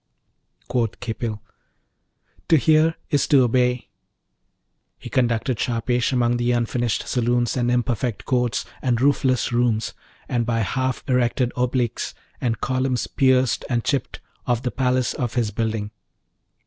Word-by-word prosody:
Quoth 115 -4 -1
Khipil, 110 -3 -4 1.0
'To 160 - +5
hear 155 +4 +4 0.2
is 145 - +2
to 140 -4 +5
obey.' 125 0 +1 1.1
He - - -10
conducted 120 -1 +1
Shahpesh 120 +1 0
among 120 -2 +2
the 120 0 +1
unfinished 120 -1 -1
saloons 120 -1 +1
and 120 -2 +1
imperfect 120 -2 -1
courts 125 -2 0 0.2
and 120 -3 +1
roofless 130 -2 +2
rooms, 120 -2 +1 0.3
and 120 -1 0
by 115 -1 0
half 130 +4 -1
erected 125 -1 +1
obelisks, 125 -1 -1 0.3
and 115 -3 -1
columns 130 -1 0
pierced 130 -3 +2
and 120 -2 0
chipped, 140 -4 -2 0.3
of 120 0 0
the 125 - -1
palace 130 -1 +1
of 120 -2 -3
his 115 -4 0
building. 110 -1 -2
125 Hz, 130 wpm, -23 LUFS, 120-130 Hz, 1.1 s, To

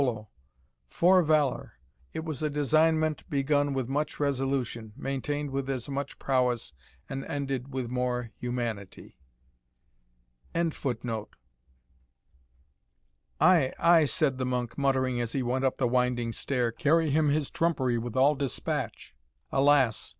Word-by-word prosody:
'Fore 180 - +4
valour! 155 -4 +1 0.4
it 160 - -5
was 155 -4 -4
a 155 - 0
designment 155 +2 +2
begun 145 0 +1
with 130 -3 -2
much 145 +3 -2
resolution, 135 -5 -1
maintained 145 +1 -3
with 135 0 -3
as 130 -3 -2
much 140 0 -4
prowess, 125 - 0 0.3
and 135 0 -5
ended 135 -3 -3
with 130 -2 -3
more 125 -1 -2
humanity."] 120 -5 -5 1.4
"Ay, 170 +1 +2 2.8
ay," 170 0 +5
said 140 -3 0
the - - 0
monk, 125 -2 -2
muttering 130 -3 +1
as 115 -1 -3
he 135 - 0
went 130 +2 -1
up 130 -1 +1
the 130 - +1
winding 125 -1 +1
stair, 120 0 -1
"carry 155 +5 +2
him 150 +1 +3
his 145 -1 0
trumpery 130 -8 +1
with 115 0 -6
all 140 +3 +5
despatch. 140 -3 -4 0.4
Alas! 135 -4 +3
135 Hz, 120 wpm, -28 LUFS, 125-150 Hz, 2.8 s, ay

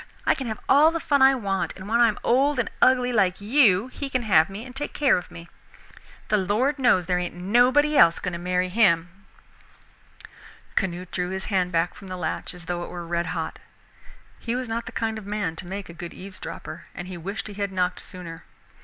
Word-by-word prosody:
I - - +4
can 265 - -5
have 220 -1 -3
all 295 +3 +6
the 330 0 -2
fun 285 -3 +1
I 270 0 +7
want, 195 -6 -2
and 190 0 -9
when 230 +2 +1
I 240 - +7
am 215 - -1
old 275 +4 +3
and 240 - -1
ugly 250 -1 +4
like 190 -5 +2
you 210 -3 +4
he 275 +2 -6
can 255 -2 -1
have 190 -6 +4
me 205 +4 -7
and 255 0 -11
take 290 +2 -4
care 285 -3 +3
of 180 - -4
me. 170 0 -11 0.8
The 210 - +3
Lord 225 +10 0
knows 240 -9 +3
there 180 +1 +1
ain't 175 0 -4
nobody 245 +11 +3
else 170 -10 +6
going 180 - -4
to 170 - -4
marry 180 +1 0
him." 180 -5 +3 1.6
Canute 180 -2 -2
drew 180 -1 -2
his 190 0 -4
hand 180 -2 +1
back 165 +1 +1
from 195 - -12
the 185 0 -6
latch 180 - -4
as 175 -2 -10
though 175 0 -3
it - - -7
were 175 -1 -7
red 170 0 -1
hot. 165 -1 -4 0.8
He 235 0 -3
was 255 0 -3
not 230 +1 -3
the - - -6
kind 220 -1 -2
of 205 - -12
man 205 -6 -2
to 175 - -8
make 195 +1 -6
a 170 - -10
good 170 0 -8
eavesdropper, 185 -4 -8
and 180 - -6
he 185 - -7
wished 195 +4 -5
he 210 - -7
had 200 -1 -3
knocked 180 -1 -1
sooner. 170 -3 -9
195 Hz, 225 wpm, -25 LUFS, 180-240 Hz, 1.6 s, I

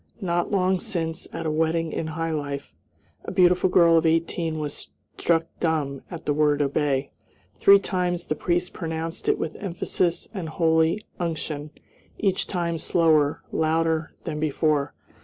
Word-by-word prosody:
Not 175 -2 0
long 185 -2 +2
since, 170 -7 -3
at 165 - -5
a 155 - 0
wedding 160 +1 0
in 160 - -3
high 165 +1 -2
life, 145 -2 -4 0.5
a - - -5
beautiful 180 0 +4
girl 170 -2 +6
of 160 - -3
eighteen 165 0 0
was 150 -2 -5 0.3
struck 165 -1 +2
dumb 150 -5 -1
at 170 -2 -8
the 145 - +1
word 150 -1 +2
"obey." 140 -1 0 0.4
Three 200 0 +7
times 180 -3 -1
the - - -1
priest 175 +3 -1
pronounced 165 0 -4
it - - +3
with 160 - -4
emphasis 175 -2 -1
and 180 -6 -4
holy 160 +4 +2
unction, 155 -3 -3 0.5
each 195 -2 0
time 170 -3 -2
slower, 155 -3 +2
louder, 160 0 0
than 150 - -4
before. 150 -1 0
165 Hz, 150 wpm, -25 LUFS, 155-175 Hz, 0.5 s, Three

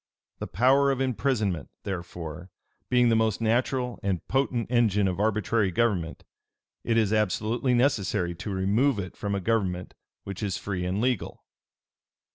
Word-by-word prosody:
The - - -4
power 135 +7 +3
of 135 -2 0
imprisonment, 115 - 0
therefore, 85 -2 -6 0.4
being 125 -1 +4
the 115 - +3
most 110 -2 +1
natural 125 +2 0
and 95 -3 -2
potent 125 -3 0
engine 105 -5 +3
of 90 0 -2
arbitrary 105 0 +1
government, 90 -4 0 0.6
it 115 - +1
is 110 -2 +2
absolutely 110 +5 +1
necessary 105 -8 +1
to 85 +4 -7
remove 105 +7 +2
it 95 -3 -5
from 100 -1 -2
a - - -1
government 95 -4 -1 0.3
which 100 0 -7
is 100 -3 -1
free 95 -3 -3
and 95 +3 -1
legal. 125 -3 -2
105 Hz, 145 wpm, -27 LUFS, 95-120 Hz, 0.6 s, being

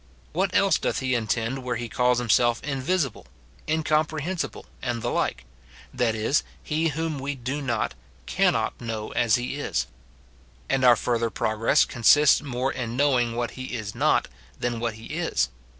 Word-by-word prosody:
What - - +1
else - - +4
doth - - -1
he 130 -1 0
intend 115 +3 -1
where 125 -1 -2
he 120 +1 -4
calls 125 +1 +2
himself 120 0 +3
invisible, 140 - -1 0.4
incomprehensible 155 +2 -1 0.2
and 120 -3 -3
the - - -1
like? - - -1 0.3
— - - -21
that 120 -3 +1
is, 110 +7 +2 0.2
he 160 +2 0
whom 160 -1 -2
we 140 +2 -3
do 135 +3 -4
not, 120 - -1 0.3
cannot, - - +1
know 110 -2 -4
as 115 -3 +3
he 125 +3 -3
is. - - -1 0.8
And 135 -1 +1
our 125 -1 +8
fur 120 +1 0
ther 115 0 0
progress 110 +6 +2
consists 145 +4 +5
more 130 -1 -2
in 120 -1 -4
knowing 125 -5 +2
what 120 -1 -2
he 130 -1 -6
is 110 -3 -5
not, - - +2 0.3
than 120 -1 -1
what 115 -2 -2
he 110 +1 -11
is. - - -1
125 Hz, 165 wpm, -25 LUFS, 115-140 Hz, 0.8 s, our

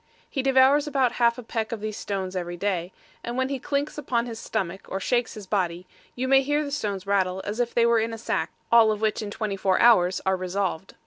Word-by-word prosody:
He 270 - -2
devours 270 +2 +4
about 265 -4 +2
half 235 0 +4
a 250 - -7
peck 225 0 -3
of 230 - -3
these 215 0 -4
stones 190 -3 -4
every 175 -1 -4
day, 180 -2 -2 0.3
and 240 +1 -4
when 260 0 0
he 275 -1 -2
clinks 285 +3 -2
upon 240 -5 -1
his 230 -2 -7
stomach, 195 -5 -4
or 195 - -3
shakes 240 +4 0
his 210 -2 -8
body, 180 -3 -1 0.3
you 255 +1 -2
may 270 0 +6
hear 290 +2 0
the 285 - -5
stones 205 -9 -3
rattle 190 -2 +1
as 210 +3 -4
if 240 -1 -1
they 235 - +4
were 235 -1 +4
in 225 +1 -1
a 225 - -5
sack, 225 - -2 0.2
all 230 -2 +6
of 210 - -2
which 220 0 0
in 210 - -5
twenty 210 -1 -3
four 190 -1 +1
hours 185 -6 +5
are 190 0 +2
resolved. 185 -1 -3
220 Hz, 240 wpm, -25 LUFS, 190-250 Hz, 0.3 s, may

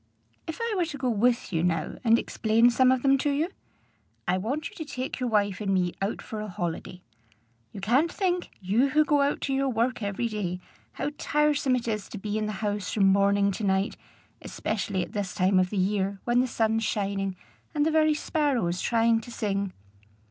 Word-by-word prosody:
"If 320 - -4
I 465 -1 -1
were 360 -3 +1
to 310 -3 -6
go 255 -2 0
with 235 -1 +1
you, 165 0 +1
now, 165 -3 -1
and 230 -1 +5
explain 230 +1 +3
some 255 +2 +4
of 260 -1 +1
them 275 0 +4
to 290 - +1
you? 295 +5 0 0.8
I 180 - +2
want 240 +11 -2
you - - -17
to 320 - -4
take 260 -4 -5
your 250 -1 -1
wife 205 -3 +1
and 200 -2 -1
me 180 -2 +1
out 195 +3 -2
for 215 -1 -6
a 215 - -5
holiday. 180 -1 -5 0.7
You 195 - -8
can't 260 - +2
think, 360 -3 -1
you 215 +9 +2
who 305 +2 +3
go 295 -2 +3
out 280 +1 +1
to 275 - -1
your 270 0 +1
work 240 +1 0
every 205 +3 -1
day, 195 -5 -3 0.3
how 290 - -3
tiresome 295 -3 +2
it 240 -1 -3
is 215 -2 -2
to - - -7
be 210 +2 -2
in 215 - -1
the 215 - -3
house 205 -2 -2
from 195 -3 +4
morning 200 0 +3
to 205 - -5
night, 190 0 +1 0.5
especially 200 -3 -2
at - - -9
this 200 -3 -3
time 185 +1 +3
of 185 0 +2
the 205 - -4
year, 195 +1 0
when 240 0 +2
the 255 - +2
sun's 225 -1 +1
shining, 195 -2 -1 0.4
and 295 0 +2
the 320 - +2
very 310 -1 +4
sparrows 260 - 0
trying 230 -1 +2
to 235 - -11
sing!" 200 -4 -2
220 Hz, 210 wpm, -27 LUFS, 195-270 Hz, 0.8 s, and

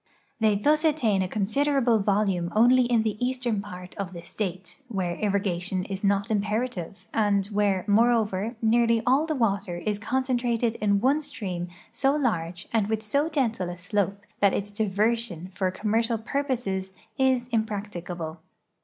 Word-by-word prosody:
They 215 -2 +3
thus 300 +9 +2
attain 255 -11 +2
a 185 - 0
considerable 235 +4 +2
vol 205 +1 +2
ume 175 -3 -1
only 245 +3 +6
in 240 -2 +2
the 215 +1 -2
eastern 245 -4 0
part 180 -3 -9
of 190 -2 -4
the 170 -1 -8
State, 185 +5 -5
where 185 -6 -2
irrigation 190 -2 -1
is 195 0 -5
not 200 +2 +2
imjierative, 210 -2 -2
and 205 -3 +2
where, 205 -2 0
moreover, 220 0 +2
nearly 230 0 +3
all 275 +5 +3
the 310 - -1
water 200 -7 0
is 205 +3 -2
concen 255 +3 0
trated 235 -1 0
in 200 -1 +2
one 280 +5 +3
stream 190 - -4 0.2
so 275 +1 +2
large 180 - -1
and 220 -3 +2
with 220 0 -1
so 280 +9 +1
gentle 230 - 0
a 175 - -6
slope 200 +2 -1 0.2
that 200 -2 +4
its 205 +1 -3
diversion 210 -3 0
for 185 0 0
commercial 225 +4 0
purposes 225 -6 -2 0.3
is 260 -2 +2
impracticable. 195 -7 -3
210 Hz, 155 wpm, -26 LUFS, 195-240 Hz, 0.3 s, only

